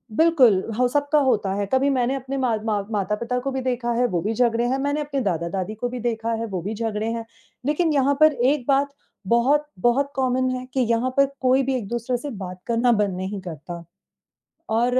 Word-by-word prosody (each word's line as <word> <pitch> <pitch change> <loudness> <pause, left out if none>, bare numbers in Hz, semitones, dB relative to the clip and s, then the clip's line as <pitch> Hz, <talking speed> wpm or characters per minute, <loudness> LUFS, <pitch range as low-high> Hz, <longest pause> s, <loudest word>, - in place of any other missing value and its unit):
बिल्कुल, 260 - +5 0.2
हो 250 0 +3
सबका 290 +3 +2
होता 225 -8 +1
है। 200 0 -1
कभी 270 +2 +3
मैंने 260 -1 +1
अपने 270 +1 -4
माँ 250 -4 +1
माँ 210 -2 0
माता-पिता 210 +4 -1
को 270 +2 -3
भी 265 0 -2
देखा 245 -2 -1
है, 245 +1 +2
वो 175 -6 -1
भी 215 +3 -1
झगड़े 235 0 +2
हैं, 260 +2 0
मैंने 285 +2 0
अपने 285 -2 -2
दादा-दादी 185 +2 -2
को 245 +3 -3
भी 250 0 -5
देखा 230 -1 -2
है, 230 - -2
वो 190 -5 -4
भी 205 +5 -4
झगड़े 220 -1 -2
हैं 230 -1 -4 0.4
लेकिन 305 +3 +1
यहाँ 280 0 +3
पर 310 - +8
एक 260 +1 +1
बात 280 0 +3 0.4
बहुत 270 +7 +3
बहुत 275 +5 +2
कॉमन 255 -1 +1
है 255 0 -5
कि 265 - 0
यहाँ 235 +2 +2
पर 275 - +6 0.2
कोई 260 +1 +3
भी 265 0 0
एक-दूसरे 240 +2 -2
से 285 +5 -6
बात 185 0 -7
करना 235 +1 +2
बंद 205 -4 +1
नहीं 190 +2 -4
करता 170 0 -8 0.9
और 245 +2 +2
245 Hz, 210 wpm, -23 LUFS, 215-270 Hz, 0.9 s, पर